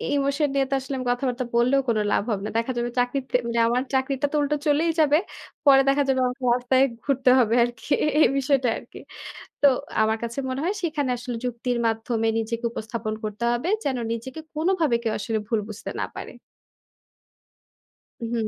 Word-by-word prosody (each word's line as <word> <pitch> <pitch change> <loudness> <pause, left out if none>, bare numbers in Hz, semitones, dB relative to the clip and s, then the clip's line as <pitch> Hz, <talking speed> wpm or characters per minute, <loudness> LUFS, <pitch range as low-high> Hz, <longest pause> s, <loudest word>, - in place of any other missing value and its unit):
Emotion 280 +1 +1
নিয়ে 275 -1 +2
তো - - -2
আসলে 270 +1 -5
আমি 255 - -4
কথাবার্তা 250 0 -1
বললেও 250 +4 +4
কোনো 220 -2 +2
লাভ - - +2
হবে 205 -3 -1
না। - - -3
দেখা 230 +3 0
যাবে 240 0 -1
চাকরির 245 +2 +1
তে - - -1
মানে 235 0 0
আমার 245 +2 +1
চাকরিটা 265 +1 0
তো - - -2
উল্টো 290 +1 +1
চলেই 305 +3 +3
যাবে, 300 -1 +5 0.5
পরে 270 -1 +7
দেখা 280 +1 +3
যাবে 265 -1 +2
আমাকে 250 +1 -6
রাস্তায় 250 +1 +2 0.2
ঘুরতে 270 -2 +2
হবে 230 -2 +3
আরকি 240 +2 -6 0.3
এই - - +7
বিষয়টা 275 -1 +2
আরকি। - - -12 0.6
তো - - +6 0.4
আমার 220 0 +2
কাছে 235 +2 -5
মনে 260 +1 -3
হয় 375 +4 0
সেখানে 300 -6 -1
আসলে 245 0 -5
যুক্তির 245 0 -2
মাধ্যমে 225 0 0
নিজেকে 230 +1 -3
উপস্থাপন 220 -1 -4
করতে 215 +2 -4
হবে। 240 +8 -1 0.2
যেন 270 -2 0 0.2
নিজেকে 255 +6 -6
কোনোভাবে 320 -5 +1
কেউ 225 -2 -1
আসলে 220 +1 -2
ভুল 225 -2 +1
বুঝতে 215 0 -7
না - - 0
পারে। - - -7 1.9
হুম। 230 -1 -2
250 Hz, 180 wpm, -24 LUFS, 230-275 Hz, 1.9 s, পরে